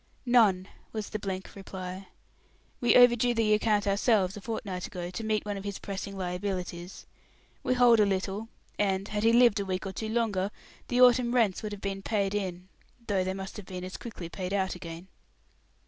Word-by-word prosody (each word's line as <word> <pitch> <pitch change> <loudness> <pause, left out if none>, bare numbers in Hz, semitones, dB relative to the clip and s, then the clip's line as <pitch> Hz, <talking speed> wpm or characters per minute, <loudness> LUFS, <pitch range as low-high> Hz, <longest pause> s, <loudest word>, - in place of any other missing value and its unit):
"None," 215 -7 +4 0.3
was 215 -2 -4
the 215 - -4
blank 190 -2 -5
reply. 190 -1 -7 0.7
"We 240 - +4
overdrew 245 -1 +6
the 220 -2 +3
account 210 -1 +2
ourselves, 200 -1 +2
a 205 - -8
fortnight 195 -5 -4
ago, 175 -1 -6
to 205 +5 -5
meet 215 -1 0
one 205 -1 -3
of 195 - -7
his 200 -1 -4
pressing 200 0 -6
liabilities. 180 -1 -4 0.6
We 255 - +1
hold 240 -2 +6
a 210 - +6
little; 195 +2 -2 0.3
and, 195 -1 +1
had 210 0 -2
he 225 +1 +4
lived 235 -3 +5
a 200 - -2
week 185 +1 -3
or 195 - -3
two 220 +3 -4
longer, 215 -4 0 0.4
the 245 - 0
autumn 245 -1 +5
rents 220 -6 +2
would 215 - -4
have 205 -1 -7
been 195 0 -3
paid 200 -1 0
in 185 -3 -3 0.4
though 195 -4 +1
they 190 +1 -2
must 195 +1 -7
have 205 -3 -9
been 185 -1 -6
as 185 0 -6
quickly 215 -7 -7
paid 185 +2 -5
out 190 -1 0
again." 170 0 -8
200 Hz, 195 wpm, -29 LUFS, 185-220 Hz, 0.7 s, overdrew